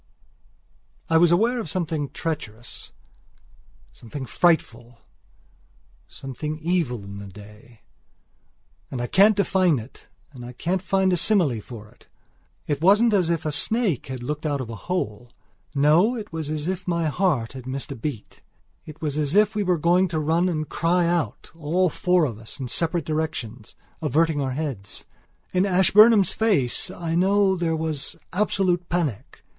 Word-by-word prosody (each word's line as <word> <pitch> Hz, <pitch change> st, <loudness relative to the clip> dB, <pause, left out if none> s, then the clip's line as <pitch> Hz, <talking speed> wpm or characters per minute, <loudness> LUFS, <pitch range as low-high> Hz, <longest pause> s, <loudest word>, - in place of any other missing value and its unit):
I 165 Hz, -, +5 dB
was 170 Hz, 0 st, +5 dB
aware 230 Hz, +8 st, +2 dB
of 195 Hz, -, -5 dB
something 160 Hz, -5 st, -2 dB
treacherous, 120 Hz, -7 st, -6 dB, 1.0 s
something 130 Hz, +4 st, -8 dB
frightful, 120 Hz, -, 0 dB, 1.1 s
something 150 Hz, +3 st, -6 dB
evil 160 Hz, -, -1 dB
in 100 Hz, 0 st, -9 dB
the 100 Hz, -, -8 dB
day. 105 Hz, +3 st, -15 dB, 1.1 s
I 120 Hz, -2 st, -3 dB
can't 200 Hz, -, +5 dB
define 185 Hz, -5 st, +2 dB
it 115 Hz, +2 st, -11 dB, 0.2 s
and 125 Hz, -2 st, -10 dB
can't 185 Hz, +2 st, -1 dB
find 190 Hz, 0 st, +1 dB
a -, -, +2 dB
simile 165 Hz, -, +2 dB
for 110 Hz, -1 st, -11 dB
it. -, -, -24 dB, 0.6 s
It 145 Hz, -1 st, -2 dB
wasn't 210 Hz, +6 st, +5 dB
as 185 Hz, -5 st, +2 dB
if 165 Hz, -2 st, -1 dB
a 155 Hz, -, 0 dB
snake 205 Hz, -, +1 dB
had 130 Hz, -2 st, -6 dB
looked 150 Hz, +4 st, -4 dB
out 145 Hz, -3 st, -1 dB
of 120 Hz, -3 st, -5 dB
a -, -, -6 dB
hole. 120 Hz, -, -3 dB, 0.4 s
No, 160 Hz, -, +4 dB
it 215 Hz, -7 st, -7 dB
was 160 Hz, -2 st, -4 dB
as 155 Hz, 0 st, -3 dB
if 185 Hz, -1 st, -3 dB
my 170 Hz, -2 st, 0 dB
heart 150 Hz, -7 st, 0 dB
had 130 Hz, -1 st, -9 dB
missed 135 Hz, +3 st, -4 dB
a -, -, -4 dB
beat. 120 Hz, -3 st, -6 dB, 0.5 s
It 155 Hz, +1 st, -11 dB
was 150 Hz, -1 st, -1 dB
as 150 Hz, +3 st, -1 dB
if 210 Hz, 0 st, +4 dB
we 210 Hz, -, -1 dB
were 180 Hz, -3 st, +1 dB
going 175 Hz, +4 st, +3 dB
to 160 Hz, -2 st, -2 dB
run 165 Hz, +4 st, +1 dB
and 155 Hz, -3 st, -2 dB
cry 175 Hz, +1 st, +1 dB
out; 170 Hz, -1 st, -2 dB
all 170 Hz, +4 st, +1 dB
four 180 Hz, 0 st, +2 dB
of 115 Hz, -6 st, -5 dB
us 115 Hz, +4 st, -10 dB
in 130 Hz, -2 st, -5 dB
separate 165 Hz, +6 st, 0 dB
directions, 130 Hz, -8 st, -4 dB, 0.3 s
averting 155 Hz, 0 st, +1 dB
our 130 Hz, -2 st, -2 dB
heads. 130 Hz, -9 st, -5 dB, 0.5 s
In 185 Hz, 0 st, +3 dB
Ashburnham's 200 Hz, +3 st, +5 dB
face 185 Hz, -, +1 dB
I 165 Hz, -1 st, -4 dB
know 195 Hz, +3 st, +3 dB
that 175 Hz, -, -4 dB
there 165 Hz, -1 st, +1 dB
was 160 Hz, -2 st, -3 dB, 0.2 s
absolute 185 Hz, -3 st, 0 dB
panic. 165 Hz, -, -3 dB
160 Hz, 160 wpm, -24 LUFS, 130-180 Hz, 1.1 s, I